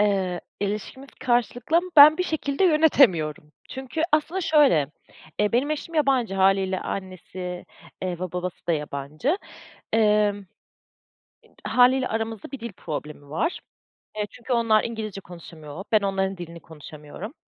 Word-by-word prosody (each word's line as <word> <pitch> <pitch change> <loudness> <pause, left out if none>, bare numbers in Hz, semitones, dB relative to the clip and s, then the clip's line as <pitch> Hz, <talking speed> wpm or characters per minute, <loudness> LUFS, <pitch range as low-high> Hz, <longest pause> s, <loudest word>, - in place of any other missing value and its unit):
Eee, 190 -4 +1 0.2
ilişkimiz 210 +7 -4
karşılıklı 245 +5 +1
ama 360 +2 +1
ben 300 +2 +10
bir - - +2
şekilde 315 0 -1
yönetemiyorum. 190 - +3 0.2
Çünkü 265 +4 -4
aslında 315 +5 +1
şöyle, 295 - +4 0.5
eee, 210 +1 +1
benim 265 +5 +1
eşim 305 +2 -4
yabancı. 265 -9 +2
Hâliyle 190 -1 +2
annesi, 185 -1 -6 0.4
eee, 180 -2 -3
ba 185 -1 -5
babası 180 0 -5
da 170 - +2
yabancı. 150 - -2 0.5
Emm, 210 -2 +2 1.0
ib - - -24 0.2
hâliyle 255 +1 +4
aramızda 225 -1 -4
bir 275 - -6
dil 235 -2 -6
problemi 150 -3 -7
var. 325 - -1 0.6
Eee, 210 - 0
çünkü 250 +1 -4
onlar 230 -2 +3
İngilizce 215 -4 -5
konuşamıyor. 165 -2 -10
Ben 215 - +4
onların 195 -1 -1
dilini 170 -1 -8
konuşamıyorum. 155 - -10
210 Hz, 135 wpm, -24 LUFS, 180-265 Hz, 1.0 s, ben